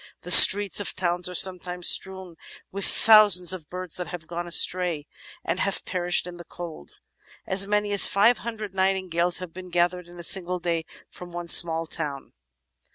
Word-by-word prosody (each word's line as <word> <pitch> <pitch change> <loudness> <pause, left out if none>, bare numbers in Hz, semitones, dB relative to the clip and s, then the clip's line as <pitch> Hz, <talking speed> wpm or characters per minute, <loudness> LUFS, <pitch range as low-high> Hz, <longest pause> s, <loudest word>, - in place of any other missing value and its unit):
"The 180 - -1
streets 200 +2 +8
of 205 - -6
towns 180 -1 -4
are 180 - -9
sometimes 180 -1 0
strewn 190 -2 -3 0.4
with 200 0 -5
thousands 205 -5 +4
of 165 -4 -12
birds 180 -2 -8
that 180 - -7
have 175 -2 -11
gone 175 +1 -8
astray 175 -3 +1 0.4
and 180 - -4
have 200 0 -4
perished 175 -2 -2
in 175 -1 -11
the 175 - -12
cold. 165 - -13 0.5
As 190 +1 +1
many 210 0 -3
as 200 - +7
five 215 +4 0
hundred 215 -3 -9
nightingales 185 -3 -3
have 180 -2 -11
been 185 0 -12
gathered 175 0 -3
in 175 0 -17
a - - -10
single 180 +1 -2
day 170 -2 -5 0.3
from 180 -1 -14
one 175 0 -9
small 165 -1 +2
town." 145 -4 -9
180 Hz, 175 wpm, -22 LUFS, 175-190 Hz, 0.5 s, streets